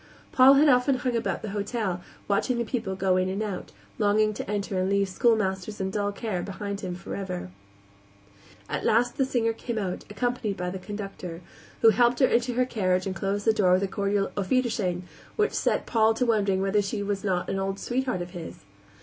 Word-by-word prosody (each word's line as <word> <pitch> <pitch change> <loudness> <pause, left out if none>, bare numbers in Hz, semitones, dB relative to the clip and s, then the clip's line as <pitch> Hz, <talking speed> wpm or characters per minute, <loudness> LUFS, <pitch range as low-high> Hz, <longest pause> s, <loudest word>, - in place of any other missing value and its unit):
Paul 265 +2 +7
had 295 +3 +5
often 255 0 +4
hung 250 -1 -1
about 230 - -2
the 215 - -4
hotel, 205 -3 -2 0.3
watching 205 +5 +1
the 235 - -1
people 220 -5 -3
go 190 -1 +2
in 185 0 +1
and 195 +3 -2
out, 200 -4 -5 0.3
longing 215 0 +3
to 200 - -6
enter 200 -2 -1
and 185 +1 0
leave 200 0 +2
schoolmasters 205 -1 0
and 190 0 -2
dull 205 -1 0
care 200 -3 -3
behind 200 +2 -5
him 180 -2 -4
forever. 180 - -5 1.2
At - - -3
last 240 +2 +2
the 270 - +3
singer 230 -3 +1
came 230 +1 -5
out, 190 -4 -3
accompanied 235 -2 -2
by 180 0 -3
the 190 - -5
conductor, 195 -4 -7 0.4
who 225 - +9
helped 240 +3 +3
her 265 - +6
into 245 0 +1
her 250 +1 +2
carriage 185 -6 0
and 190 -1 -3
closed 200 +1 -2
the 220 - +5
door 185 -4 +3
with 185 +2 +3
a - - +1
cordial 200 +1 0
auf 195 -2 -2
wiedersehen 220 -8 0 0.3
which 425 0 +1
set - - 0
Paul 220 -1 +3
to 250 - +1
wondering 200 -4 +2
whether 195 +1 +2
she 205 +1 -3
were 200 0 -1
not 185 -3 0
an 195 - -1
old 195 0 -2
sweetheart 250 -7 -1
of 175 - -10
his. 175 -3 -8
205 Hz, 205 wpm, -26 LUFS, 190-230 Hz, 1.2 s, who